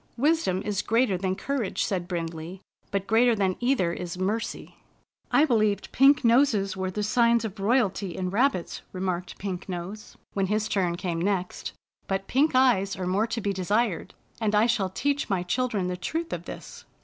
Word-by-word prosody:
" - - -37
Wisdom 250 - +1
is 205 -1 0
greater 230 -2 +2
than 185 +1 -1
courage," 260 -3 -2
said 180 -3 -2
Brind 170 -2 -2
ley, 165 +4 -8 0.2
" - - -40
but 200 -1 -2
greater 230 +3 +4
than 190 -3 +1
either 240 -9 +1
is 175 0 -5
mercy." 210 +5 -3 0.5
I 300 - +5
believed 215 -7 +1
pink 275 0 +5
noses 230 -5 +3
were 190 0 -2
the 210 +3 -3
signs 235 +1 +3
of 210 -1 -6
roy 220 +6 +3
alty 195 -6 -1
in 185 -1 -2
rabbits," 220 -4 0
remarked 185 -2 -3
Pink 190 -1 -5
Nose, 185 +4 -6 0.2
when 195 -1 0
his 215 +2 0
turn 180 -4 0
came 170 -2 -3
next, 185 -1 -2 0.3
"but 195 0 -1
pink 275 +5 +2
eyes 235 -7 +3
are 185 - -4
more 195 +5 +1
to 230 0 -3
be 200 0 -1
desired, 200 +1 -1 0.2
and 215 -2 +1
I 210 +2 +5
shall 215 -5 +1
teach 285 +9 -1
my 190 -3 0
children 215 0 -1
the 180 0 -2
truth 320 - -3
of - - -5
this." - - -9
200 Hz, 190 wpm, -26 LUFS, 185-235 Hz, 0.5 s, I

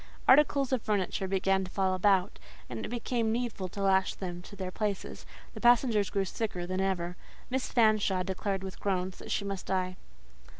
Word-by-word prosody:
Articles 275 -1 +5
of 255 - +1
furniture 195 -3 -1
began 190 0 +1
to 185 - -6
fall 190 0 +1
about, 190 0 +2 0.3
and 115 -2 -4
it - - -4
became 235 -1 -1
needful 230 -5 -2
to 200 +2 -5
lash 190 -1 +3
them 175 -2 -5
to 190 - -12
their 185 -2 -4
places; 205 -1 -3 0.3
the - - -9
passengers 240 -4 +4
grew 195 -1 0
sicker 185 -3 -3
than 185 +1 -2
ever; 180 -2 -1 0.4
Miss 260 0 -1
Fanshawe 215 -5 +3
declared, 195 +1 -2
with 190 -1 -7
groans, 185 -2 -1
that - - -10
she 200 - -1
must 195 -2 -4
die. 185 -1 -1
195 Hz, 180 wpm, -30 LUFS, 185-215 Hz, 0.4 s, Articles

